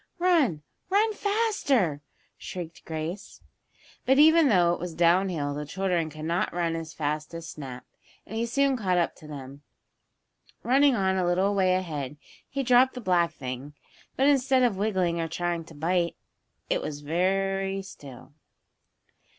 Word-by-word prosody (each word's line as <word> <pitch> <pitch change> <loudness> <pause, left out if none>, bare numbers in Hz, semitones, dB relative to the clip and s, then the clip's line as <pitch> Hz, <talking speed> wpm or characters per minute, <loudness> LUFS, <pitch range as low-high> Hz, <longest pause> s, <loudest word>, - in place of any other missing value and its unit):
"Run! 320 - +2 0.3
Run 425 +3 +3
faster!" 400 - +1 0.3
shrieked 170 -3 -8
Grace. 160 +5 -6 0.6
But 265 +1 +3
even 315 0 +6
though 175 -5 +4
it - - -4
was 175 -1 -5
down 175 +3 +3
hill 145 -5 -2
the 150 +1 -4
children 175 0 -1
could 155 0 -8
not 170 +2 0
run 170 -1 -1
as 165 -1 -5
fast 150 +1 -3
as 165 0 -7
Snap, 130 -4 -8 0.4
and 220 - -8
he 230 +1 -1
soon 275 +3 +2
caught 190 -7 0
up 170 - 0
to 155 - -13
them. 140 -1 -9 1.0
Running 275 +2 +4
on 190 -2 +1
a 185 - +1
little 190 +3 +2
way 185 -2 +3
ahead 150 -6 -4 0.3
he 275 0 -2
dropped 255 +1 +4
the - - -5
black 180 -6 +2
thing. 130 +2 -7 0.4
But 270 - +2
instead 270 -2 +3
of 240 -5 +2
wiggling 185 -4 0
or 165 - -2
trying 170 0 -2
to 160 - -14
bite, 170 +3 0 0.5
it - - 0
was 145 -1 -6
I - - -13
very 195 +3 0
still. 145 -7 -12
180 Hz, 160 wpm, -27 LUFS, 160-235 Hz, 1.0 s, even